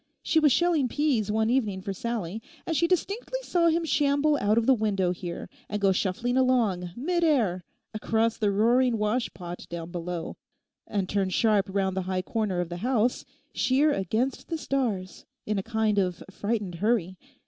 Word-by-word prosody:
She 320 - +3
was 300 -2 +4
shelling 330 -2 +3
peas 250 -7 0
one 220 +1 +1
evening 215 -7 0
for 195 - -3
Sallie, 220 -1 -4 0.2
and 325 - -1
she 335 - +3
distinctly 400 +8 -1
saw 345 -7 +2
him 335 0 +2
shamble 295 0 +2
out 210 +2 +2
of 230 - +3
the 265 - +6
window 200 -6 +1
here, 175 -1 -6 0.2
and 210 - -2
go 195 -1 +3
shuffling 225 +7 0
along, 230 -9 +2
mid 345 +7 0
air, 220 - +2 0.3
across 225 +1 0
the 210 - +1
roaring 235 +4 +3
washpot 210 -5 -3
down 170 0 -6
below, 175 -1 -5 0.7
turn 195 -1 0
sharp 210 0 +2
round 190 -1 0
the 190 - 0
high 185 -1 -1
corner 210 -4 -1
of 175 - -4
the 175 - -5
house, 245 +3 0 0.3
sheer 280 +4 +3
against 220 +7 -1
the 330 - -2
stars, 230 -11 -2 0.2
in 210 -1 -1
a - - -1
kind 220 -1 0
of 180 -3 -1
frightened 205 -2 -2
hurry. 205 -5 +1
220 Hz, 170 wpm, -27 LUFS, 190-260 Hz, 0.7 s, the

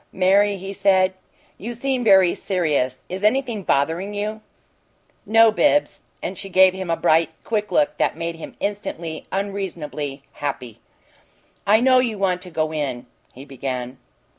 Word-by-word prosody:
"Mary," 195 +2 +3
he 195 +1 -7
said, 190 -1 +3 0.5
"you 235 +4 -6
seem 260 +1 -1
very 190 -5 +5
serious. 150 -9 -1
Is 190 +2 -6
anything 235 -1 +1
bothering 170 +6 0
you?" 215 +1 -3 0.9
"No, 225 0 +6
Bibbs." 290 +6 +2 0.2
And - - -4
she 195 - -7
gave 185 0 +5
him 190 -2 -6
a 165 - +1
bright, 160 +1 +3
quick 210 -2 -2
look 300 0 +2
that - - +1
made 165 0 -3
him 165 - -10
instantly 175 -6 -4
unreasonably 170 -8 -4
happy. 130 -5 -5 0.9
"I 215 +3 +5
know 255 0 +5
you 235 -4 0
want 185 -2 0
to 185 - -8
go 155 -1 -2
in 135 -5 -3
" - - -38
he 135 +2 -10
began. 130 -2 -5
190 Hz, 155 wpm, -22 LUFS, 155-210 Hz, 0.9 s, No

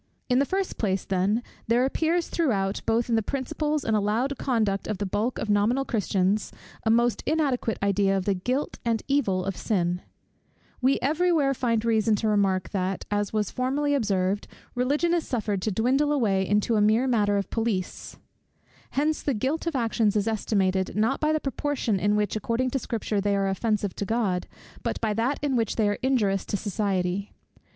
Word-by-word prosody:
In 250 0 +4
the 280 - +3
first 385 0 -2
place, 195 -4 0
then, 195 +5 +1 0.2
there 240 +3 +3
appears 325 +5 0
throughout, 205 - 0
both 225 +1 +2
in 235 - -1
the 225 - +3
principles 290 +5 -2
and 220 - +1
allowed 220 +7 0
conduct 215 -6 0
of 215 - -2
the 200 - -2
bulk 215 +6 -1
of - - -3
nominal 215 +6 +2
Christians, 200 -3 0 0.3
a - - +1
most 235 +1 +3
inadequate 280 -7 0
idea 200 0 +2
of 185 - -3
the 200 - +2
guilt 250 +10 -2
and 230 -2 0
evil 200 -10 +1
of 195 -1 -2
sin. 180 -4 -1 0.8
We 265 +2 +3
every 325 +6 +2
where 285 -5 +3
find 230 -3 0
reason 220 -1 +3
to 220 +2 -1
remark, 195 -3 +1
that, 190 -1 -2
as 205 -1 0
was 215 -2 -1
formerly 280 +3 0
observed, 200 -6 0 0.3
Religion 290 +7 +1
is 340 -2 0
suffered 210 -5 -1
to 215 - -1
dwindle 260 +8 +2
away 200 -9 +1
into 210 +2 +2
a - - +3
mere 215 +4 +3
matter 210 -5 +2
of 200 - -3
police. 220 -5 -2 0.8
Hence 305 +2 +1
the 280 - -1
guilt 280 +10 -1
of 330 - -1
actions 225 -4 +1
is 210 0 +1
estimated, 195 -4 0
not 225 +6 +1
by 305 0 +1
the 310 - +1
proportion 270 -7 -1
in 205 +3 +2
which, 210 0 0
according 230 +4 -1
to 270 - 0
Scripture, 220 -4 -2
they 200 0 +1
are 195 0 +1
offensive 205 0 -1
to 200 - -2
God, 200 -4 0 0.3
but - - -2
by 220 -2 0
that 235 +6 0
in 280 -3 +1
which 230 -3 0
they 220 -2 +2
are 205 - -1
injurious 215 -7 +1
to 205 - -2
society. 195 -2 -2
220 Hz, 190 wpm, -26 LUFS, 200-260 Hz, 0.8 s, In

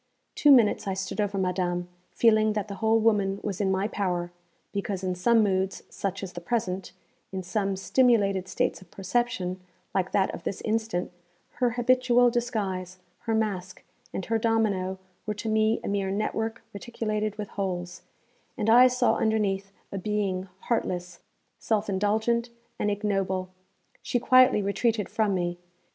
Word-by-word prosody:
Two 295 - +3
minutes 235 -6 +5
I 190 - -1
stood 190 +3 -3
over 200 -1 -1
madame, 180 -1 -1 0.2
feeling 215 -2 +3
that 210 -1 -2
the 200 - -6
whole 225 0 +4
woman 205 -3 +2
was 205 -2 -3
in 195 - +1
my 190 +1 +1
power, 180 -5 -2 0.4
because 200 -1 -3
in 185 -1 0
some 225 +5 +3
moods, 190 -1 0
such 195 0 -3
as 185 -2 -6
the 175 - -7
present, 190 -3 -2 0.4
in 190 -1 -4
some 195 +1 -1
stimulated 195 -2 +2
states 185 - -1
of 185 - -16
perception, 195 -2 -2 0.3
like 185 -1 0
that 190 -1 +1
of - - -7
this 185 - -4
instant, 220 -5 -1 0.5
her 245 - +4
habitual 245 0 +4
disguise, 200 -7 -2 0.3
her 225 - +2
mask, 195 -4 -2 0.3
and 190 - -4
her 225 0 0
domino 210 -5 +1 0.3
were 210 - -1
to 210 - -6
me 220 +1 +2
a - - -4
mere 200 -1 0
network 220 +3 -2
reticulated 215 -1 -3
with 210 -2 -5
holes; 180 -2 -4 0.6
and 220 +1 +2
I 250 +2 +8
saw 250 0 +2
underneath 200 -3 0 0.2
a 195 - -3
being 195 -2 -2
heartless, 180 -6 -2 0.4
self 220 -1 0
indulgent, 220 +4 +1 0.3
and 210 - +1
ignoble. 195 -3 -1 0.5
She - - -1
quietly 255 -3 +5
retreated 210 +2 0
from 210 -3 +1
me. 175 -1 -2
205 Hz, 155 wpm, -27 LUFS, 190-225 Hz, 0.6 s, I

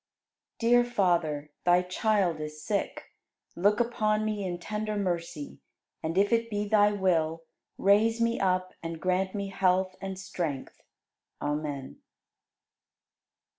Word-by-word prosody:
68. 230 - 0
Dear 245 0 +7
Father, 170 -10 0
Thy 175 0 +4
child 185 -2 +1
is 155 0 -6
sick. 205 -2 -2 0.4
Look 205 +4 +3
upon 215 -3 +1
me 210 -2 -2
in 180 -2 -3
tender 210 +3 -3
mercy, 170 - -3 0.4
and 165 +3 -3
if 205 +3 +3
it 230 0 +1
be 205 -1 -2
Thy 205 0 +5
will, 165 -5 +1 0.3
raise 220 +3 +4
me 230 0 +1
up 185 -1 +1
and 165 -1 -5
grant 185 +2 0
me 200 -1 -3
health 185 -1 +1
and 195 -1 -5
strength. 175 -7 -4 0.6
Amen. 145 -2 -3
190 Hz, 130 wpm, -28 LUFS, 170-210 Hz, 0.6 s, Dear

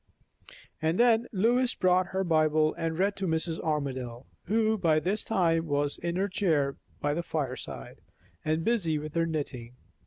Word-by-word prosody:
And 160 +4 0
then 235 -1 +4
Lois 240 +5 +2
brought 185 0 +3
her 190 +1 -1
Bible 155 -2 +3
and 165 -1 -3
read 200 +2 +1
to 195 -1 -2
Mrs. 160 0 -1
Armadale, 130 -5 -3 0.2
who 220 +2 +2
by 165 -6 +2
this 195 +6 0
time 165 -5 +1
was 145 0 0
in 170 0 -2
her 195 +2 +1
chair 155 -8 0 0.2
by 145 0 0
the 170 - -1
fireside, 145 -6 -5 0.4
and 155 +1 0
busy 190 -10 +1
with 150 0 -6
her 165 0 +1
knitting. 125 -6 -4
165 Hz, 160 wpm, -28 LUFS, 150-190 Hz, 0.4 s, then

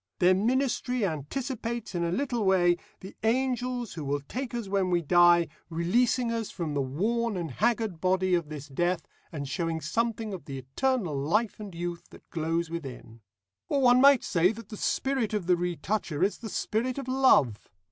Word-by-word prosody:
Their 180 +1 +5
ministry 250 +2 +1
anticipates 230 - -4
in 175 -1 -1
a 170 - 0
little 245 +1 -1
way 175 -3 +4 0.2
the 190 - -9
angels 245 0 0
who 160 - -6
will 140 0 -1
take 245 - -5
us 235 -4 -3
when 195 -1 +1
we 175 -1 +1
die, 175 +1 +5 0.2
releasing 230 +9 +1
us 230 -2 -2
from 165 -5 -4
the 140 - 0
worn 210 - -1
and 165 -4 -4
haggard 215 - 0
body 185 0 +2
of 170 -4 +1
this 150 -1 -7
death, 175 +5 -1 0.2
and 145 -3 -5
showing 165 +2 -2
something 225 +2 -2
of 185 - -7
the 135 -2 -6
eternal 175 - -1
life 200 +13 0
and 200 -4 -8
youth 175 0 -5
that - - -16
glows 165 +1 -1
within. 130 -8 -8 0.5
Or 280 - +2
one 245 0 +6
might 275 -2 +7
say 180 0 +3
that 225 -2 -11
the 215 - -7
spirit 260 -4 0
of 205 -4 -2
the 180 0 +4
retoucher 175 -1 -2
is 200 - 0
the 225 - -6
spirit 240 +6 -1
of 275 -2 -5
Love. 255 - +3
190 Hz, 180 wpm, -28 LUFS, 165-235 Hz, 0.5 s, might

